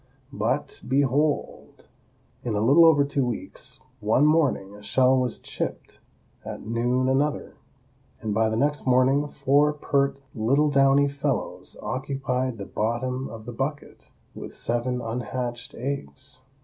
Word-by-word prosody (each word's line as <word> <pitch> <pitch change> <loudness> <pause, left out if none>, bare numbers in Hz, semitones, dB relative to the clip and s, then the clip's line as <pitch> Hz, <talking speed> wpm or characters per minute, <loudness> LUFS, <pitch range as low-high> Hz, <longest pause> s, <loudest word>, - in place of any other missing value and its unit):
But, - - -2
behold! 140 +3 0 0.6
in 115 -3 -2
a - - +1
little 140 +9 +6
over 145 -3 +5
two 140 -1 0
weeks, 125 +2 -5 0.2
one 110 +7 +3
morning 145 -11 +2
a 105 - -12
shell 130 +5 +3
was 125 -2 -1
chipped, - - -5 0.4
at - - -7
noon 120 +3 +1
another, 140 +3 0 0.7
and 110 -2 -3
by 110 +1 +2
the 110 - -1
next 145 +2 0
morning 130 +3 +3
four 145 +1 +2
pert 140 -2 0
little 140 +6 +2
downy 140 0 +5
fellows 140 0 -3
occupied 130 -2 -2
the 100 - -6
bottom 125 +5 -2
of 110 -1 -9
the 120 - -6
bucket, 145 +5 -5 0.2
with - - -9
seven 125 +1 -1
unhatched 120 +1 -4
eggs. 130 0 -6
130 Hz, 135 wpm, -25 LUFS, 120-140 Hz, 0.7 s, little